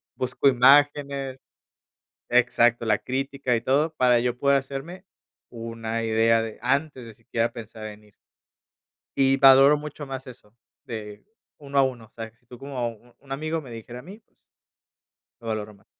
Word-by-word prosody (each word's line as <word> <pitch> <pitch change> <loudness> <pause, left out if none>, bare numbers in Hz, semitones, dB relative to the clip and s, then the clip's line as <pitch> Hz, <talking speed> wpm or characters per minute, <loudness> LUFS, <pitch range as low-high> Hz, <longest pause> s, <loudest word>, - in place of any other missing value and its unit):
busco 130 +2 0
imágenes 140 +1 +3 0.9
Exacto, 120 -1 +3
la 105 -2 +2
crítica 135 -1 -2
y 115 - -3
todo 150 +6 +1
para 125 -3 +4
yo 120 0 -1
poder 140 +2 +3
hacerme 140 +8 -7 0.5
una 115 -1 -5
idea 115 0 +3
de 110 -1 -7
antes 135 0 -1
de 115 - -11
siquiera 115 +1 -2
pensar 110 -1 -9
en 105 0 -11
ir. 105 - -24 1.0
Y 135 0 +3
valoro 135 +2 +7
mucho 150 0 -8
más 135 0 -7
eso 115 -4 -14 0.3
de 105 -2 -8 0.3
uno 140 -1 -6
a 135 - +6
uno. 125 -4 -3
O - - -24
sea, 115 -1 -7
si 115 - -38
tú 125 0 -13
como 130 -4 -3
u 115 +2 -16
un 135 - -18
amigo 155 +4 -2
me 130 -5 -12
dijera 115 +2 -9
a - - -10
mí, 190 - -12
pues 220 - -44 1.0
lo 115 - -11
valoro 110 -1 -4
más. 100 - -26
125 Hz, 170 wpm, -25 LUFS, 115-140 Hz, 1.0 s, valoro